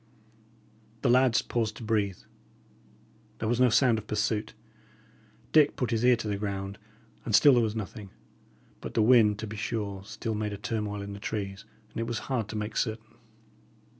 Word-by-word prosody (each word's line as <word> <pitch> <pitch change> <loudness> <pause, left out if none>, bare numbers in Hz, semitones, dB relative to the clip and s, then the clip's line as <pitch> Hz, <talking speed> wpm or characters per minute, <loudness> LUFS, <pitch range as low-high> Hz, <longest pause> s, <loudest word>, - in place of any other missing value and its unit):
The 125 - +4
lads 125 -3 +4
paused 110 -3 -2
to - - -8
breathe. 105 -4 0 1.2
There 110 - -3
was 120 +2 +1
no 125 -1 +5
sound 120 -1 +4
of 105 - -12
pursuit. 105 0 -1 1.0
Dick 150 -2 +5
put 125 -2 -2
his 115 0 0
ear 125 0 +6
to 110 -2 -5
the 100 -1 -1
ground, 100 -1 -4 0.4
and 110 - +1
still 145 +4 +7
there 120 - +4
was 110 -1 -1
nothing; 105 -1 -6 0.7
but - - -8
the 110 - +4
wind, 110 -3 +5
to 110 - -5
be 110 0 -7
sure, 100 -3 -3
still 110 +2 -4
made 105 -1 -2
a - - -5
turmoil 105 -1 -3
in 100 0 -6
the 100 - -8
trees, 100 -2 -4 0.3
and - - -6
it 115 - -2
was 120 -1 -2 0.2
hard 115 -5 0
to - - -6
make 105 0 -3
certain. 110 0 -2
110 Hz, 185 wpm, -28 LUFS, 105-115 Hz, 1.2 s, still